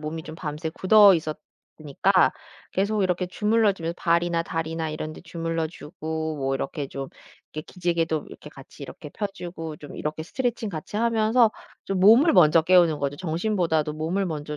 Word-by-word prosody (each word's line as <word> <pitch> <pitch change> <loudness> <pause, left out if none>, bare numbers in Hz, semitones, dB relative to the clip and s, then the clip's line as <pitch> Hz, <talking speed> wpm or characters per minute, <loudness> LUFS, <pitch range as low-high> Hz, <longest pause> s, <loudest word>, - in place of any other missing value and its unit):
몸이 155 +1 -5
좀 155 - -8
밤새 155 +1 -5
굳어 200 +3 +6
있었으니까 155 +2 -1 0.4
계속 200 +2 0
이렇게 180 0 0
주물러 210 +3 +2
주며 170 -3 -4
발이나 170 -1 +1
다리나 165 -1 -3
이런 155 0 -5
데 - - -11
주물러 165 -1 -3
주고 160 -1 -5
뭐 135 -1 -1
이렇게 140 +1 -4
좀 135 -1 -6 0.4
이렇게 155 - -5
기지개도 170 -4 -1
이렇게 150 - -12
같이 135 0 -14
이렇게 145 +2 -9
펴 205 - -3
주고 170 -5 -7
좀 145 -1 -11
이렇게 155 +1 -4
스트레칭 240 +1 -2
같이 160 +4 -6
하면서 225 0 +3 0.3
좀 195 -1 -2
몸을 230 - +6
먼저 165 -2 +6
깨우는 170 -3 +4
거죠. 140 0 -2
정신보다도 165 -3 -1
몸을 170 +6 -2
먼저 150 -2 -5
165 Hz, 375 characters per minute, -25 LUFS, 155-190 Hz, 0.4 s, 굳어